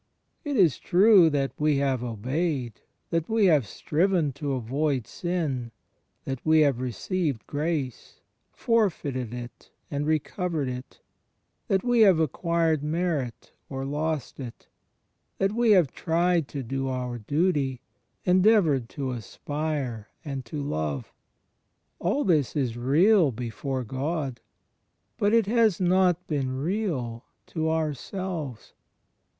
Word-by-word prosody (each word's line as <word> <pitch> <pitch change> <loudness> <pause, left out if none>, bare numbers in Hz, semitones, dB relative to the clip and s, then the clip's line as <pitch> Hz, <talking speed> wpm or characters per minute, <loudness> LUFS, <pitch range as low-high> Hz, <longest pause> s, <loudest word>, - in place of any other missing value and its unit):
It 285 -3 -2
is 175 -9 +4
true 190 -2 +6
that 140 -2 0
we 150 -1 +3
have 135 -3 0
obeyed, 125 - -2 0.3
that 165 -1 0
we 220 -2 +3
have 150 - +4
striven 165 - 0
to 140 0 -3
avoid 130 +1 -1
sin, 150 -10 -3 0.5
that 135 -2 -4
we 160 0 +5
have 140 -5 +3
received 135 - -2
grace, 145 -4 -3 0.3
forfeited 150 - 0
it 120 0 -9 0.2
and 145 +1 -2
recovered 155 -1 -1
it, 125 0 -8 0.7
that 190 -1 +1
we 245 -1 +2
have 195 -7 +6
acquired 160 0 +1
merit 150 -6 -2 0.2
or 135 -1 -4
lost 150 0 -2
it, 125 -4 -8 0.7
that 195 +1 +1
we 235 +1 +2
have 175 -9 +4
tried 170 -1 +1
to 140 -2 -5
do 135 +2 -3
our 125 -2 -3
duty, 145 - 0 0.4
endeavoured 180 - +4
to 135 -2 -4
aspire 130 0 -4 0.2
and 135 -3 -4
to 145 +5 -5
love. 75 - -3 0.9
All 205 +12 0
this 155 - +2
is 130 -6 0
real, 155 - +4
before 125 +3 -4
God. 135 +1 -3 0.8
But 205 - +3
it 230 -2 +4
has 220 -3 +3
not 180 -1 +3
been 135 -4 -2
real 140 - -2 0.3
to 160 -1 -1
ourselves. 160 - -3
150 Hz, 120 wpm, -26 LUFS, 130-175 Hz, 0.9 s, true